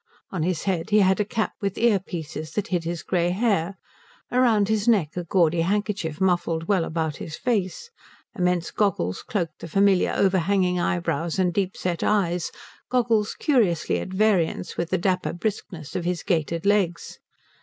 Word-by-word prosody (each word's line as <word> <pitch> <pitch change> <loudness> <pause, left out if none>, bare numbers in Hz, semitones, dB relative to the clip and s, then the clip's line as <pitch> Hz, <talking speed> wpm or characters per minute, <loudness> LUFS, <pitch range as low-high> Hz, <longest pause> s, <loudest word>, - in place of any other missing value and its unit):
On 185 - -3
his 175 0 -1
head 185 -1 -1
he 210 0 +5
had 190 +1 +3
a - - +3
cap 220 +2 -2
with 200 -2 -2
ear 230 -4 +3
pieces 160 -4 -6
that 210 - -2
hid 175 -3 -1
his 170 0 -3
grey 175 -2 +1
hair; 195 -2 0 0.5
round 235 -5 +3
his 215 0 0
neck 195 -10 +3
a 180 - -2
gaudy 170 -1 +2
handkerchief 195 -4 -1
muffled 175 -3 +1
well 190 -5 +2
about 160 -2 -2
his 160 - -6
face; 230 - -2 0.4
immense 180 -3 0
goggles 170 - 0
cloaked 170 -7 -3
the - - -7
familiar 195 +2 +3
overhanging 185 -1 +2
eyebrows 170 -1 -1
and 180 -2 +2
deep 190 0 -1
set 175 -2 -2
eyes, 180 -5 +1 0.4
goggles 230 -4 +1
curiously 220 - +1
at - - -5
variance 190 -4 +1
with 170 0 -2
the 185 - +1
dapper 185 +1 0
briskness 175 -5 -5
of 180 - -1
his 175 -1 -2
gaitered 165 -1 -1
legs. 200 -5 0
185 Hz, 165 wpm, -24 LUFS, 170-205 Hz, 0.5 s, he